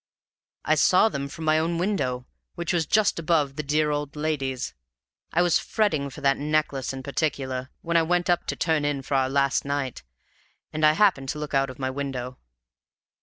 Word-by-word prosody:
"I 155 - +3
saw 180 +7 +5
them 140 -7 -4
from 160 +3 -7
my 155 0 +4
own 165 +1 0
window, 150 -10 -1 0.3
which 170 +1 -2
was 165 -3 +1
just 205 -1 +2
above 155 -4 +1
the 155 - -2
dear 150 +1 +1
old 145 0 -3
lady's. 140 -4 -2 0.6
I 175 - +3
was 175 -2 +3
fretting 160 -11 0
for 145 - -11
that 140 -1 +3
necklace 150 -2 -1
in 135 -1 -7
particular, 130 -2 -2
when 170 0 +1
I - - +5
went 175 +2 +1
up 175 -1 +1
to - - -1
turn 160 -3 +1
in 145 -2 -1
for 140 - -5
our 130 -1 +2
last 140 0 +2
night 140 -3 -3 0.7
and 155 0 -2
I 155 0 +7
happened 155 -8 +2
to 150 - -2
look 150 -1 -5
out 135 0 +2
of 130 - -9
my 130 -1 -2
window. 130 -2 -5
145 Hz, 195 wpm, -25 LUFS, 135-160 Hz, 0.7 s, I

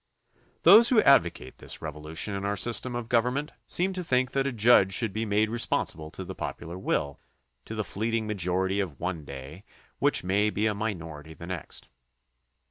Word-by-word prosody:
Those 215 +7 +8
who 245 - +5
advocate 85 - +2
this - - -3
revolution 80 +5 -4
in 100 - -4
our 100 0 -1
system 120 +4 +1
of 120 -2 -4
government 125 +6 0 0.2
seem 185 +2 +2
to 185 -1 -4
think 130 -4 +1
that 135 0 0
a - - -1
judge 110 -5 +4
should 110 -5 -2
be 110 +1 -2
made 105 +1 +1
responsive 80 -9 -1
to - - -6
the - - -6
popular 85 +2 -6
will, 70 -6 -2 0.5
to 110 - -7
the 110 - -1
fleeting 110 +4 -2
majority 95 -1 -1
of 85 -9 -4
one 85 -4 -4
day 70 +6 -9 0.4
which - - +2
may 100 +3 +2
be 105 +1 -1
a 110 - +2
minority 80 -7 -6
the 85 - -10
next. 90 -3 -6
105 Hz, 180 wpm, -27 LUFS, 85-120 Hz, 0.5 s, Those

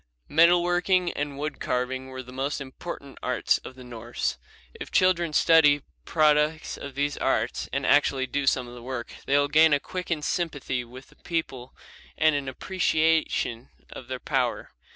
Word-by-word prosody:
Metal 170 +3 +5
working 180 0 +2
and 145 -1 -4
wood 150 0 -4
carving 130 +1 -2
were 130 0 -7
the 125 - -12
most 135 +3 -2
important 140 +1 -8
arts 125 - +1
of 130 - -11
the 130 - -12
Norse. 120 -1 -4 0.3
If - - -8
children 175 -3 +3
study 150 -3 +5 0.2
products 155 0 +2
of 140 -1 -9
these 145 +1 -1
arts - - -1
and - - -2
actually 130 -1 +3
do 140 +1 -2
some 125 - +2
of 120 - -11
the 120 - -10
work, 120 -1 -6
they 140 - +4
will 145 0 +3
gain 155 +1 +5
a 145 - +3
quickened 170 -2 -4
sympathy 145 -7 -2
with 125 +2 -13
the - - -22
people 135 -7 -4 0.4
and 155 0 +4
an 140 -2 -2
appreciation 160 -6 0 0.2
of 120 - -9
their 130 0 -4
power. 130 -4 -1
145 Hz, 170 wpm, -26 LUFS, 130-160 Hz, 0.4 s, Metal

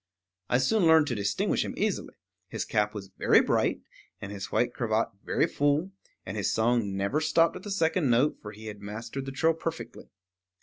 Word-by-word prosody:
I 125 - +3
soon 170 - +2
learned 160 -1 +6
to - - -1
distinguish 100 -1 0
him - - -5
easily; - - -2 0.3
his - - -4
cap 105 0 0
was 100 -2 -7
very - - +5
bright, - - +1 0.4
and 100 - -7
his 100 -1 -6
white 120 - +1
cravat 110 -2 0
very - - +1
full, 145 +6 0 0.3
and 95 - -5
his 100 - 0
song 110 -4 +1
never 100 +11 0
stopped 165 +1 +3
at 185 - -7
the 205 - -8
second 165 -5 +1
note, 125 +6 +2
for 105 - -8
he 110 +1 -12
had 105 -2 -8
mastered 115 +6 -6
the - - -3
trill 160 +4 +2
perfectly. 165 0 -6
120 Hz, 190 wpm, -28 LUFS, 105-160 Hz, 0.4 s, learned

